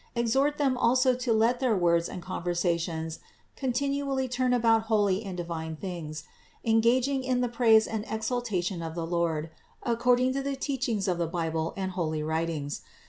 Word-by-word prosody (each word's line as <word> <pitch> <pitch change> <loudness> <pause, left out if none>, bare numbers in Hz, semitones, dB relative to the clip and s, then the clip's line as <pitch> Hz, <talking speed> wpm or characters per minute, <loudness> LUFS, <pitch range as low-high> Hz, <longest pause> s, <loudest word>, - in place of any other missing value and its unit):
Exhort 265 +5 +2
them 265 -4 +1
also 255 +2 +4
to 250 -1 -2
let 230 +3 +3
their 250 -5 +2
words 170 -1 +2
and 180 - -7
conversations 170 -3 -2 0.4
continually 275 +1 -1
turn 255 0 0
about 225 -2 +3
holy 205 -2 +2
and 190 -3 -6
divine 165 -2 -4
things, 155 -4 -6 0.4
engaging 240 +4 +3
in 255 -1 +1
the 245 - +1
praise 230 -2 +4
and 220 -2 -3
exaltation 220 -5 -2
of 165 0 -5
the 170 -1 -2
Lord 165 -2 -1 0.3
according 245 +2 +2
to 275 - -1
the 275 0 -2
teachings 255 -7 -1
of 180 -2 0
the 170 - 0
Bible 165 -1 -2
and 190 -1 -2
holy 160 -4 -2
writings. 160 -2 -2
220 Hz, 160 wpm, -28 LUFS, 170-250 Hz, 0.4 s, also